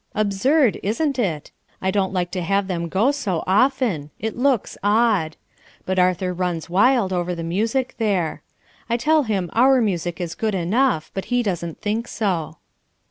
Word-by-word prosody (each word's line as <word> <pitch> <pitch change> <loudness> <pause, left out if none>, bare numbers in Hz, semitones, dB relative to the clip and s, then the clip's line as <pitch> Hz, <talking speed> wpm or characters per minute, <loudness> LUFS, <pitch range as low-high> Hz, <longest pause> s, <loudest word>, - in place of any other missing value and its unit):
Absurd, 215 +6 +2
isn't 265 +6 -1
it? 165 -10 -2 0.3
I 190 - 0
don't 195 -1 0
like 180 -2 -2
to 185 - -3
have 195 +3 +1
them 170 -3 -3
go 215 - +2
so 210 - -2
often. 210 - +1
It 220 0 -4
looks 250 -3 +1
odd. 205 -6 +2 0.5
But 185 0 0
Arthur 180 0 +1
runs 175 -2 -3
wild 205 0 +3
over 175 0 -1
the 165 - -5
music 225 +10 -1
there. 195 -7 0 0.5
I 235 - +2
tell 310 +6 +3
him 200 - -2
our 260 +3 +5
music 175 -6 -1
is 170 -3 -3
good 215 +1 -2
enough, 190 0 +1
but 195 - -4
he 245 0 0
doesn't 170 -5 -3
think 220 +3 -2
so." 170 -7 -2
195 Hz, 165 wpm, -22 LUFS, 175-235 Hz, 0.5 s, our